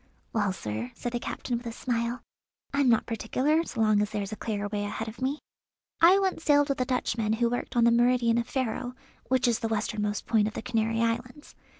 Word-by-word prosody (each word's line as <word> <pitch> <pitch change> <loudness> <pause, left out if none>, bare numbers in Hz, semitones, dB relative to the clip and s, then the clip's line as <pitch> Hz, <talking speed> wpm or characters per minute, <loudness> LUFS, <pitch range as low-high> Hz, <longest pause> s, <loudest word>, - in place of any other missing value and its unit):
"Well, 205 -3 +1
sir," 110 - -4
said 240 - -4
the 240 - -2
captain 240 0 -3
with 240 0 -8
a - - -3
smile, 235 +1 -2 0.5
"I'm 280 -2 +3
not 230 - +3
particular, 260 +8 +1
so 230 - -3
long 215 -1 +4
as 210 - 0
there's 205 -2 -3
a - - -3
clear 205 -2 -3
way 205 0 -2
ahead 220 +2 -4
of 220 +4 -9
me. 270 +3 0 0.6
I 350 +3 +8
once 380 -4 0
sailed 290 -1 +4
with 275 -2 0
a - - +1
Dutchman 230 -4 0
who 235 +1 +1
worked 245 - -3
on 240 - +4
the 235 - +6
meridian 235 0 +3
of 235 - -3
Ferro, 250 -1 -2 0.3
which 255 -1 +2
is 235 -2 +2
the 225 - -1
westernmost 210 -1 -2
point 220 -3 +3
of 215 - -6
the - - -4
Canary 225 -2 0
Islands. 245 +5 -2
235 Hz, 220 wpm, -28 LUFS, 215-250 Hz, 0.6 s, I